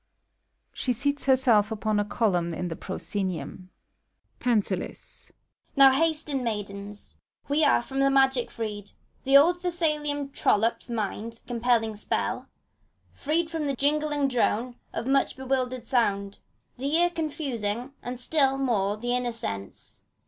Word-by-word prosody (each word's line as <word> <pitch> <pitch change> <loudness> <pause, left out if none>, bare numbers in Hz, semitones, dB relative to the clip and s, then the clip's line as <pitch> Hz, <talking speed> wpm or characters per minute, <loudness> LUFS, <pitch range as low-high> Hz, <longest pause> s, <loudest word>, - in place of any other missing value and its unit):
(She 250 - -1
seats 285 +4 -1
herself 250 -6 +4
upon 215 0 0
a - - +2
column 180 -6 0
in 180 +1 -3
the 165 - -4
proscenium,) 185 -1 -4 0.7
PANTHALIS. 210 -6 -2 0.4
Now 275 -1 +8
hasten, 300 -2 +1
maidens! 205 -2 -5 0.3
we 290 +2 +2
are 240 - +4
from 270 +2 -4
the 275 0 +4
magic 270 -2 +3
freed. 210 -3 -6 0.3
The 270 +1 +7
old 350 +5 +4
Thessalian 300 -5 -1
trollop's 230 -2 +1
mind 225 0 -4
compelling 235 -2 +1
spell, 210 - -2 0.3
— - - -40
Freed 320 +3 +1
from 320 -2 -2
the 280 -1 -1
jingling 295 +1 +1
drone 245 -1 0 0.2
of - - -4
much 275 +1 +2
bewildering 255 -2 -2
sound, 205 -6 0 0.4
The 280 +4 -1
ear 350 +1 +4
confusing, 270 -7 -3
and 245 0 -6
still 270 0 +2
more 210 -6 0
the 245 +3 -1
inner 250 -1 -1
sense. 100 - -6
250 Hz, 135 wpm, -26 LUFS, 210-280 Hz, 0.7 s, Now